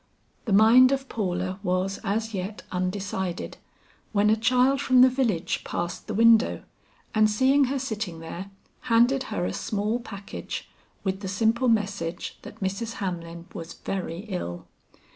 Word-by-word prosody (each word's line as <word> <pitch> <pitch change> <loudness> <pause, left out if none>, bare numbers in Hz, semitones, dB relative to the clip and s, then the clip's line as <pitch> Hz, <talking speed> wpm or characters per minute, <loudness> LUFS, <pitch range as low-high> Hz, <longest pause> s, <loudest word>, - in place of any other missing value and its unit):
The 225 - -2
mind 230 +6 +7
of 270 0 -1
Paula 185 -3 -2
was 185 0 -1
as 220 +2 -1
yet 195 +2 -4
undecided, 185 -1 -3 0.6
when 210 0 +4
a - - +5
child 255 +4 +3
from 255 -2 +5
the 260 - +8
village 235 -10 0
passed 175 0 -4
the 215 - -3
window, 230 +1 +5 0.5
and 215 0 +4
seeing 265 +6 +4
her 275 +2 -1
sitting 220 -10 -4
there, 170 +4 -7 0.4
handed 240 +4 +4
her 210 -5 -1
a - - -2
small 215 +3 -1
package 200 -4 -7 0.4
with 190 -1 -1
the 200 - -5
simple 225 +6 +1
message 200 -6 -1
that 220 - -12
Mrs. 195 +4 -2
Hamlin 170 -4 -5
was 165 -4 -7
very 180 -3 -4
ill. 180 - -5
210 Hz, 145 wpm, -26 LUFS, 185-230 Hz, 0.6 s, the